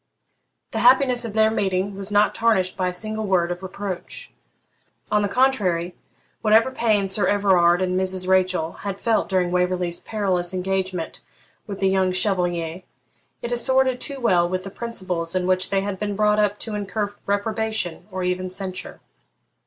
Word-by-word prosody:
The - - -2
happiness 255 - +4
of 220 - -5
their 220 0 +3
meeting 195 -2 -1
was 195 0 -4
not 205 +1 +3
tarnished 210 -5 +1
by 185 - -1
a - - -1
single 215 +3 -3
word 175 -2 +2
of 175 +1 -5
reproach. 190 -1 -6 0.8
On 210 - +3
the 205 - +1
contrary, 195 -8 +1 0.5
whatever 220 +4 +4
pain 215 -6 +1
Sir 190 -1 +2
Everard 185 -3 +3
and 185 0 0
Mrs. 185 -1 -1
Rachel 185 -3 +2
had 200 -1 -4
felt 225 -2 +1
during 185 -2 +1
Waverley's 180 -1 0
perilous 185 -4 -2
engagement 185 -2 -3 0.5
with 200 -2 -6
the 195 - +3
young 190 -1 +2
Chevalier, 175 -3 0 0.6
it 235 - -4
assorted 260 +1 +2
too 280 -2 -3
well 180 -8 +2
with 185 0 -2
the 195 - -8
principles 185 -7 -4
in 185 -1 0
which 185 0 +1
they 195 -1 +1
had 195 -1 -4
been 205 -1 -2
brought 210 0 +2
up 210 -1 +1
to 220 - -3
incur 205 0 -3
reprobation, 205 -3 -2
or 185 -1 -4
even 180 0 -1
censure. 185 0 -6
190 Hz, 165 wpm, -23 LUFS, 185-210 Hz, 0.8 s, happiness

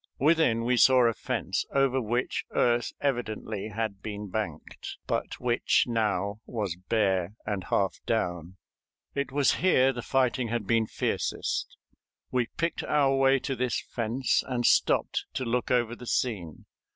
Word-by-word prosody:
Within 145 -6 +3
we 125 +1 +2
saw 130 +1 +6
a 115 - +3
fence - - -2
over 135 -1 +3
which 120 +2 -1
earth 120 -1 +2
evidently 110 -6 -2
had 110 -2 -4
been 105 -1 -6
banked, 90 -8 -5
but - - -2
which 120 -1 +2
now 105 -3 0
was 105 -7 -3
bare 95 0 0
and 100 -3 -3
half 100 -1 0
down. 90 -5 -2 0.6
It 140 -1 -2
was 140 -1 +2
here 135 -8 +4
the 120 - -5
fighting 130 -1 +1
had 115 -2 -2
been 115 +1 +2
fiercest. - - -2 0.5
We 125 -2 +1
picked 165 -1 -1
our 140 -2 +2
way 135 0 +4
to 135 - -2
this 125 -1 0
fence, 120 +3 -1
and 125 -2 -1
stopped - - +2
to 130 - -2
look 120 +1 -1
over 120 -2 +1
the 125 0 -11
scene. 95 -13 -2
120 Hz, 150 wpm, -28 LUFS, 105-130 Hz, 0.6 s, saw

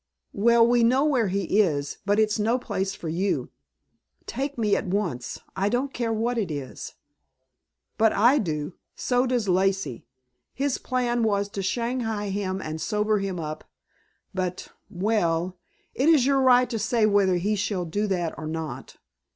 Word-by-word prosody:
"Well, 230 +3 +5
we 240 0 +3
know 260 +5 +4
where 255 -8 +2
he 195 +1 0
is. 145 -8 +1
But 205 +1 +3
it's 215 0 +2
no 225 +4 +2
place 195 -5 -3
for 165 - -7
you." 180 +5 -1 0.7
"Take 275 +1 -4
me 215 -3 +2
at - - -2
once. 180 -11 -2 0.2
I 195 +1 +1
don't 260 +4 -1
care 235 -2 -1
what 230 +2 0
it 200 -6 -2
is." 140 -4 -6 1.0
"But 220 0 +5
I 245 +7 +4
do. 155 -3 -3 0.2
So 250 +1 +1
does 245 -4 0
Lacey. 190 -8 0 0.5
His 275 0 -1
plan 245 -2 0
was 205 -2 +1
to 200 - -4
shanghai 225 0 -2
him 190 -1 -2
and 155 +1 -5
sober 210 -1 +1
him 195 -3 -3
up. 155 -1 -5 0.7
But 185 -1 -3 0.2
well 180 -3 0 0.3
it 275 +5 +2
is 300 -6 +5
your 275 0 +3
right 250 -1 +5
to 225 - -2
say 220 +1 +2
whether 200 -3 +3
he 200 +5 0
shall 200 -3 -2
do 205 +6 -1
that 175 -4 -1
or 155 - -5
not. 155 -5 -6
205 Hz, 165 wpm, -25 LUFS, 185-235 Hz, 1.0 s, Well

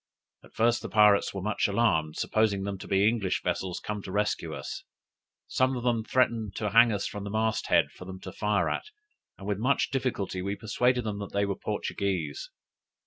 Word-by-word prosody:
At - - -19
first 120 +1 +2
the - - -6
pirates 105 -2 +5
were 95 -2 -5
much 105 +1 +1
alarmed, 95 -8 +1
supposing 105 -3 +1
them 100 -1 -4
to - - -9
be 100 +1 +3
English 110 -5 0
vessels 90 0 -2
come 105 -1 -4
to 95 - -8
rescue 105 +2 -1
us. - - -6 0.6
Some 130 0 +1
of 120 - -5
them 120 -2 +1
threatened 115 -4 +1
to 105 -2 -2
hang 115 +2 +7
us 100 -2 -1
to 105 - -6
the 100 0 -5
mast 110 +1 0
head - - +3
for 90 - -11
them 95 0 -8
to 95 - -7
fire 105 +2 0
at; - - -2 0.5
and 100 - -10
with 100 -1 -1
much 130 +5 +1
difficulty 115 -8 -2
we 100 +2 -2
persuaded 125 +3 +1
them 105 -2 -3
that 100 - -7
they 100 0 +2
were 100 -1 -2
Portuguese. 90 -7 -3
105 Hz, 200 wpm, -28 LUFS, 95-115 Hz, 0.6 s, hang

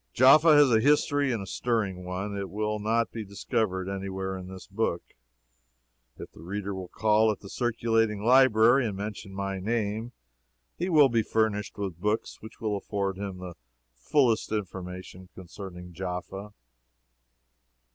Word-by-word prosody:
Jaffa 150 +5 +7
has 145 -3 +6
a 110 - +5
history 145 +1 +2
and 110 -4 -2
a - - -7
stirring 100 -4 -2
one. 95 +3 -4
It 100 -1 -4
will 105 +2 -2
not 115 +2 0
be 115 - -5
discovered 100 -2 -2
any 95 0 -4
where 95 0 -4
in 95 -1 -7
this 95 0 -10
book. 100 -4 -2 1.1
If - - -9
the - - -15
reader 100 +3 -4
will 95 -1 -6
call 110 +3 +3
at 105 - -6
the 100 - -11
circulating 115 -3 0
library 120 0 +5
and 100 -3 -4
mention 105 -1 -6
my 95 0 -3
name, 110 +3 -2 0.6
he 180 +2 -2
will 150 -5 +6
be 115 -2 +2
furnished 110 -1 -1
with 95 -4 -5
books 105 +2 -2
which 110 - -12
will 110 -2 -1
afford 100 -1 -3
him 100 -2 -5
the 90 -1 -8 0.4
fullest 120 - +1
information 95 -2 -6
concerning 90 -1 -10
Jaffa. 95 +3 -5
105 Hz, 155 wpm, -27 LUFS, 95-115 Hz, 1.1 s, Jaffa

